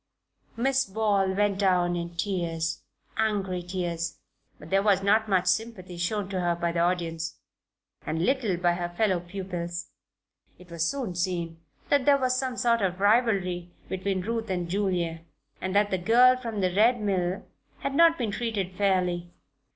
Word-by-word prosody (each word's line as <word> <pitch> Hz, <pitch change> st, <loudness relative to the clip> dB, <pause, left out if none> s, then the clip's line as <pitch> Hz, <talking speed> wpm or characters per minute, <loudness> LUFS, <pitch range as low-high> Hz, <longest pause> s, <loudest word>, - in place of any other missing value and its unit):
'" -, -, -47 dB
Miss 270 Hz, +2 st, +2 dB
Ball 200 Hz, -2 st, +1 dB
went 205 Hz, -1 st, +1 dB
down 180 Hz, -3 st, +2 dB
in 170 Hz, 0 st, -5 dB
tears 170 Hz, -4 st, -2 dB, 0.4 s
angry 200 Hz, -4 st, 0 dB
tears 175 Hz, -2 st, -3 dB, 0.4 s
but -, -, -13 dB
there 195 Hz, 0 st, +4 dB
was 200 Hz, -2 st, +3 dB
not 215 Hz, +2 st, +3 dB
much 185 Hz, -2 st, +2 dB
sympathy 185 Hz, -2 st, -1 dB
shown 190 Hz, +3 st, -1 dB
her 175 Hz, -2 st, 0 dB
by 170 Hz, 0 st, -1 dB
the 170 Hz, -, -2 dB
audience, 165 Hz, -2 st, -1 dB, 0.7 s
and 160 Hz, +3 st, -1 dB
little 245 Hz, -9 st, +1 dB
by 175 Hz, 0 st, +2 dB
her 175 Hz, 0 st, -3 dB
fellow 185 Hz, 0 st, +1 dB
pupils. 175 Hz, -1 st, -5 dB, 0.7 s
It 180 Hz, -1 st, -16 dB
was 170 Hz, -1 st, -2 dB
soon 260 Hz, -10 st, -3 dB
seen 170 Hz, -2 st, -2 dB, 0.3 s
that 285 Hz, -3 st, +3 dB
there 285 Hz, -1 st, +6 dB
was 255 Hz, -2 st, +1 dB
some 255 Hz, -1 st, -2 dB
sort 235 Hz, -1 st, +2 dB
of 185 Hz, -2 st, -1 dB
rivalry 200 Hz, -5 st, +2 dB, 0.2 s
between 190 Hz, 0 st, -1 dB
Ruth 225 Hz, +2 st, -3 dB
and 180 Hz, -2 st, -1 dB
Julia, 175 Hz, -3 st, -1 dB, 0.4 s
and 185 Hz, +1 st, -3 dB
that 205 Hz, 0 st, +3 dB
the 190 Hz, -, 0 dB
girl 245 Hz, +7 st, +6 dB
from 230 Hz, -5 st, -4 dB
the 185 Hz, -1 st, +1 dB
Red 230 Hz, +5 st, +4 dB
Mill 190 Hz, -3 st, -1 dB, 0.4 s
had 275 Hz, -, -2 dB
not 330 Hz, +2 st, +5 dB
been 230 Hz, -5 st, -1 dB
treated 200 Hz, -5 st, -3 dB
fairly. 180 Hz, -3 st, +1 dB
190 Hz, 165 wpm, -27 LUFS, 175-220 Hz, 0.7 s, there